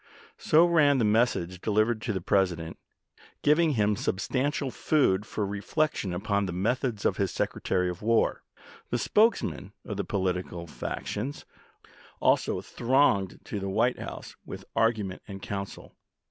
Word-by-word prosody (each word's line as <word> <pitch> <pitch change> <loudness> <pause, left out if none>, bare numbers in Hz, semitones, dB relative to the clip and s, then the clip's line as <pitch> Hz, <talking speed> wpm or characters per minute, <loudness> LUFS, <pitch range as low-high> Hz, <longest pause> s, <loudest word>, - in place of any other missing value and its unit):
So 160 +3 +5
ran 150 -5 +4
the 120 - +2
message 105 -5 +1
delivered 110 +1 +1
to 110 - -2
the 95 -3 -2
President, 85 -4 0 0.6
giving 155 +1 +4
him 105 -3 +2
substantial 130 +8 -1
food 105 -11 +1
for 105 - -2
reflection 105 - -1
upon 100 +2 0
the - - -3
methods 110 +4 -1
of - - +2
his - - +1
Secretary 90 -1 -1
of 90 -1 -5
War. 115 +1 +2 0.5
The 120 - 0
spokes 215 - +3
men 100 - -5
of 105 - -5
the 100 - -1
political 90 -3 -2
factions 105 - -5 0.7
also - - +2
thronged 120 -7 +1
to 105 - -4
the 100 0 -3
White 95 - +1
House - - -8
with - - -9
argument 110 -5 +1
and 100 -2 -7
counsel. 100 0 -6
105 Hz, 145 wpm, -28 LUFS, 95-130 Hz, 0.7 s, So